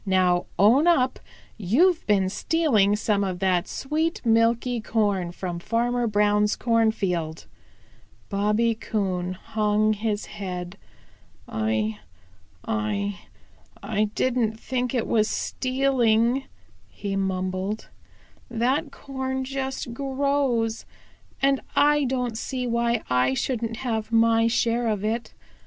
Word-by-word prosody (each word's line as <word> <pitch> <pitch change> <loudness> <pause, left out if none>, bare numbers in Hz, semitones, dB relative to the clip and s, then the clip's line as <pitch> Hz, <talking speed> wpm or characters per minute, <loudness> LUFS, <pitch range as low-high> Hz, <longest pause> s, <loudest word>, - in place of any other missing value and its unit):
Now 185 -2 +2
own 235 - +5
up 260 -7 +3 0.4
you've 300 - +3
been 200 -3 +3
stealing 210 - +2
some 210 -1 0
of 185 -2 -2
that 185 -1 +1
sweet, 315 +4 -1
milky 230 +1 +2
corn 205 -6 0
from 175 -1 -5
Farmer 235 +4 0
Brown's 210 0 +2
cornfield." 195 -9 0 0.8
Bobby 210 +3 +1
Coon 190 -5 -2
hung 215 +2 +1
his 210 0 -2
head. 180 -2 -6 0.7
"I 110 -1 -1 0.7
I 210 -3 -2 0.6
I 215 -1 +1
don't 235 -4 0
think 250 +1 -2
it 235 - 0
was 215 -1 +2
stealing," 255 -1 +1 0.4
he 200 -1 -4
mumbled. 190 +2 -2 0.6
"That 260 +6 0
corn 265 -1 -4
just 265 -2 -4
grows, 270 -4 0 0.6
and 275 -1 +3
I 295 0 +4
don't 250 -3 -2
see 255 0 -3
why 235 -1 0
I 125 +1 +2
shouldn't 230 - -2
have 220 -2 -2
my 225 0 +4
share 235 +1 +1
of 210 -2 -1
it. 225 +2 -3
225 Hz, 110 wpm, -25 LUFS, 200-250 Hz, 0.8 s, own